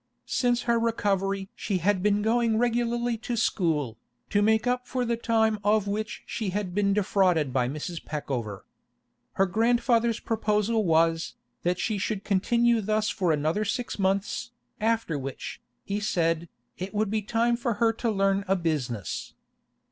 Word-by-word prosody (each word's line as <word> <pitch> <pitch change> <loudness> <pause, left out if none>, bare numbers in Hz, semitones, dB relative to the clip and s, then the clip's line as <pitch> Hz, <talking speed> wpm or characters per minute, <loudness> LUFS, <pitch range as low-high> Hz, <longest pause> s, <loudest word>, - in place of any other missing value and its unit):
Since 245 -1 +1
her 235 -1 +2
recovery 195 -4 0
she 200 -3 -1
had 185 +2 +1
been 205 +1 +2
going 230 0 +2
regularly 240 0 +1
to 240 +1 -3
school, 155 - 0 0.3
to 205 - +3
make 220 +2 +3
up 250 0 0
for 250 -1 -1
the 235 0 +1
time 220 -2 +1
of 205 0 +2
which 215 +2 -3
she 220 -4 -3
had 190 -1 -3
been 200 +1 +2
defrauded 185 -8 +2
by 125 -1 +1
Mrs. 155 +4 -5
Peckover. 125 -9 -4 0.7
Her 195 - +3
grandfather's 230 +3 +2
proposal 215 0 0
was, 165 0 +2 0.3
that 180 +1 0
she 210 +1 -1
should 205 0 -2
continue 235 +4 +2
thus 215 +1 0
for 180 -5 +1
another 155 +7 +1
six 235 +1 -3
months, 195 +4 0 0.3
after 220 -8 0
which, 135 0 -6 0.2
he 200 +1 -2
said, 165 -5 0 0.3
it 190 +3 -5
would 210 -1 +1
be 215 0 +1
time 230 +3 +1
for 235 -1 -1
her 225 +2 +2
to 230 +1 -2
learn 195 -1 +2
a 195 - +3
business. 135 - -3
205 Hz, 155 wpm, -27 LUFS, 180-230 Hz, 0.7 s, to